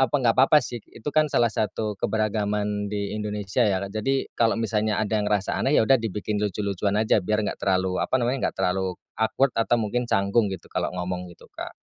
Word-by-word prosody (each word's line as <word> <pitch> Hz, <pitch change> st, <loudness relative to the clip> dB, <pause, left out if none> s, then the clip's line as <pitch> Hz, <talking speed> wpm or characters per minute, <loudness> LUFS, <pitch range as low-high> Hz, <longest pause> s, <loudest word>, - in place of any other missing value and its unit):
apa -, -, -12 dB
nggak 120 Hz, -4 st, +2 dB
apa-apa 135 Hz, +3 st, +6 dB
sih 120 Hz, -2 st, -6 dB
itu 110 Hz, -, -16 dB
kan 155 Hz, -1 st, +3 dB
salah 120 Hz, -4 st, +2 dB
satu 105 Hz, -1 st, -2 dB
keberagaman 105 Hz, -1 st, -1 dB
di 100 Hz, -1 st, -3 dB
Indonesia 105 Hz, +1 st, -3 dB
ya 95 Hz, -, +1 dB, 0.2 s
jadi 135 Hz, +5 st, 0 dB
kalau 115 Hz, -1 st, +2 dB
misalnya 110 Hz, -2 st, 0 dB
ada 110 Hz, 0 st, 0 dB
yang 105 Hz, -, -1 dB
ngerasa 105 Hz, -1 st, 0 dB
aneh 140 Hz, -, +2 dB
ya -, -, +5 dB
udah 130 Hz, +2 st, +4 dB
dibikin 105 Hz, -1 st, -3 dB
lucu-lucuan 100 Hz, -1 st, -1 dB
aja 110 Hz, 0 st, +3 dB
biar 105 Hz, +3 st, 0 dB
nggak 100 Hz, -, -4 dB
terlalu 95 Hz, -1 st, +1 dB
apa 130 Hz, -, +1 dB
namanya, 125 Hz, +2 st, 0 dB
nggak -, -, -8 dB
terlalu 95 Hz, -1 st, 0 dB, 0.2 s
awkward 125 Hz, +4 st, +2 dB
atau 115 Hz, +1 st, +2 dB
mungkin 120 Hz, +2 st, -1 dB
canggung 100 Hz, +2 st, +2 dB
gitu 95 Hz, -3 st, -6 dB
kalau -, -, -2 dB
ngomong 90 Hz, 0 st, -3 dB
gitu 85 Hz, -, -15 dB
Kak. -, -, -7 dB
105 Hz, 200 wpm, -25 LUFS, 100-115 Hz, 0.2 s, apa-apa